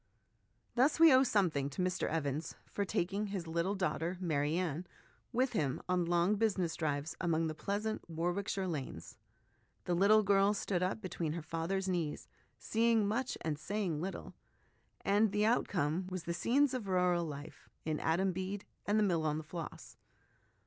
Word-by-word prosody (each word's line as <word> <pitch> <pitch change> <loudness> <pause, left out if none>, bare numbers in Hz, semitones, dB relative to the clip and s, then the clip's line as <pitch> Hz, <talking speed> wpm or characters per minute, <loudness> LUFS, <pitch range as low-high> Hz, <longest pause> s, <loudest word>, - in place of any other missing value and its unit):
Thus, 270 +6 +3
we 330 -3 +9
owe 260 - +7
something 180 - +2
to 145 - -4
Mr 185 0 0
Evans 155 0 -2
for 200 - -2
taking 200 +3 -1
his 195 -4 -4
little 170 +4 -1
daughter 180 -2 -1
Mary 155 -3 0
Anne 175 -1 -2 0.4
with 255 +1 +1
him 145 - 0
on 180 0 +2
his 175 - 0
long 175 +4 +3
business 190 -7 +1
drives 150 -1 -2
among 165 -2 +1
the 155 - -2
pleasant 205 +5 -3
War 165 +2 -1
wickshire 195 0 -2
lanes; 135 - -5 0.7
the 175 - 0
little 205 +4 +5
girl 200 +1 +4
stood 190 -3 -1
up 185 +4 -1
between 170 -4 -3
her 170 -1 -5
father's 165 +5 -2
knees, 170 -5 -2 0.3
seeing 225 -2 +2
much 245 +5 -1
and 150 -2 -2
saying 190 -5 -2
little; 190 +2 -5 0.7
and 205 +1 +3
the 210 +1 +2
outcome 180 -7 +1
was 185 -2 -4
the 170 - -2
scenes 265 +9 +2
of 245 -6 -3
rural 180 -2 +2
life 145 -2 -8 0.2
in 155 -1 -1
Adam 185 +4 +1
Bede 190 +2 -4 0.2
and 205 +1 +3
The 215 - +4
Mill 170 -5 +1
on 155 -1 0
the 160 - -4
Floss. 165 +1 -8
180 Hz, 170 wpm, -34 LUFS, 160-205 Hz, 0.7 s, we